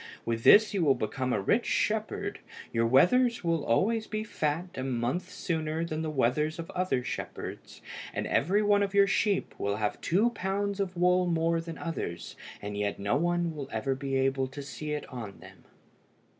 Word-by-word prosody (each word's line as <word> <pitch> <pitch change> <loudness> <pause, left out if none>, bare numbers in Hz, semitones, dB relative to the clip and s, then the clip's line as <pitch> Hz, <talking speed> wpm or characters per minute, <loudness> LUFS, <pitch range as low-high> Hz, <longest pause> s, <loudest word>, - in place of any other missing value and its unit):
With 115 0 -2
this 215 +1 +7
you 190 -4 +1
will 140 -4 +4
become 130 +4 -2
a 105 - +1
rich 95 - +1
shepherd. - - -1 0.3
Your 115 0 +2
wethers 235 - +4
will 165 -1 +1
be 145 - -6
always 220 - +1
fat 180 -6 -2
a 130 - -4
month 130 +8 -2
sooner 160 -2 -2
than 155 -1 -3
the 160 - -2
wethers 150 +3 +1
of 165 -1 -6
other 180 -9 0
shepherds, - - -6 0.3
and - - -3
every 195 +8 +2
one 205 -1 +4
of 200 0 -1
your 200 0 +7
sheep 200 0 +1
will 100 0 0
have 105 -1 -2
two 210 +8 +2
pounds 200 -1 -2
of 185 -2 -2
wool 180 +1 +3
more 165 0 +1
than 165 -1 -7
others, 85 - -5 0.3
and 105 0 -4
yet 105 0 -1
no 100 +5 0
one 170 +1 0
will 140 -2 -6
ever 130 +5 -1
be 135 0 -3
able 135 0 +1
to 135 +2 -8
see 140 +3 -6
it 150 - -3
on 110 -6 -7
them." 95 -3 -15
155 Hz, 185 wpm, -29 LUFS, 130-185 Hz, 0.3 s, this